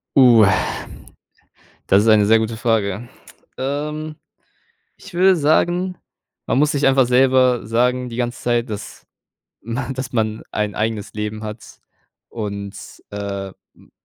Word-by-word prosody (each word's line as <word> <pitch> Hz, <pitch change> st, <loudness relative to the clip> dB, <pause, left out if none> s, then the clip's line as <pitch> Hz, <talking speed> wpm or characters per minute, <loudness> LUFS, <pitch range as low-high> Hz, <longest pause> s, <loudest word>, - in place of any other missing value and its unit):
Uh. 120 Hz, -6 st, +7 dB, 1.4 s
Das 100 Hz, +2 st, +5 dB
ist -, -, 0 dB
eine 105 Hz, -1 st, +5 dB
sehr 110 Hz, +2 st, +5 dB
gute 110 Hz, +1 st, -2 dB
Frage. 110 Hz, 0 st, -1 dB, 0.5 s
Ähm, 150 Hz, +3 st, -3 dB, 0.8 s
ich 200 Hz, -, -14 dB
würde 185 Hz, +2 st, +5 dB
sagen, 175 Hz, +4 st, +1 dB, 0.5 s
man -, -, +1 dB
muss 150 Hz, +1 st, +3 dB
sich 140 Hz, -1 st, +2 dB
einfach 135 Hz, -1 st, +4 dB
selber 130 Hz, -1 st, +3 dB
sagen 125 Hz, +2 st, +1 dB
die 115 Hz, -, -7 dB
ganze 120 Hz, 0 st, -3 dB
Zeit, 120 Hz, 0 st, 0 dB
dass 105 Hz, -2 st, -8 dB, 0.6 s
m 115 Hz, +1 st, -4 dB, 0.2 s
dass 130 Hz, -1 st, -6 dB
man 110 Hz, -2 st, -1 dB
ein 105 Hz, -1 st, -2 dB
eigenes 110 Hz, -1 st, -2 dB
Leben 105 Hz, 0 st, -4 dB
hat 110 Hz, +1 st, -9 dB, 0.5 s
und, 100 Hz, -3 st, -5 dB, 0.4 s
äh, 100 Hz, -1 st, -4 dB, 0.3 s
m -, -, -22 dB
120 Hz, 130 wpm, -20 LUFS, 105-135 Hz, 1.4 s, Uh